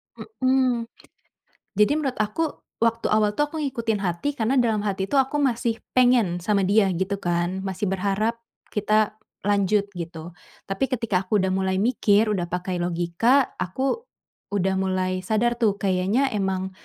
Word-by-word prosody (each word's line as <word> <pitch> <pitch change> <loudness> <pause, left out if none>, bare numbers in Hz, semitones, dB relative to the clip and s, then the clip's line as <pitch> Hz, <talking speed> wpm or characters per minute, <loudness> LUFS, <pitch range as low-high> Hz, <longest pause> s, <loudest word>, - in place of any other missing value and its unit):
Hmm. 255 - 0 0.9
Jadi, 210 +6 +4
menurut 270 -4 -2
aku 215 +10 0 0.4
waktu 230 0 +1
awal 210 -1 +2
tuh, 295 - +3
aku 320 - -8
ngikutin 235 -7 -1
hati 185 +10 -1
karena 230 +5 +1
dalam 225 -4 +2
hati 195 -2 -1
tuh 270 +7 +2
aku 270 +3 -1
masih 240 -4 +1 0.2
pengen 240 -9 +4
sama 200 +1 +1
dia 200 +1 +4
gitu, 195 +2 -2
kan. 175 +2 -1
Masih 190 +1 -3
berharap, 205 +4 -1 0.3
kita 215 0 +1 0.3
lanjut 205 0 +2
gitu. 170 -1 -7 0.3
Tapi, 195 +7 -1
ketika 230 -7 0
aku 210 +3 0
udah 190 -1 +1
mulai 190 0 0
mikir, 215 -1 +2
udah 175 -3 -2
pakai 180 0 -3
logika, 175 +10 +2
aku, 265 - -2 0.5
udah 190 -1 +1
mulai 185 -1 0
sadar 230 +5 0
tuh, 215 -4 +2
kayaknya 195 +8 +1
emang, 190 -2 -1
205 Hz, 150 wpm, -24 LUFS, 190-235 Hz, 0.9 s, Jadi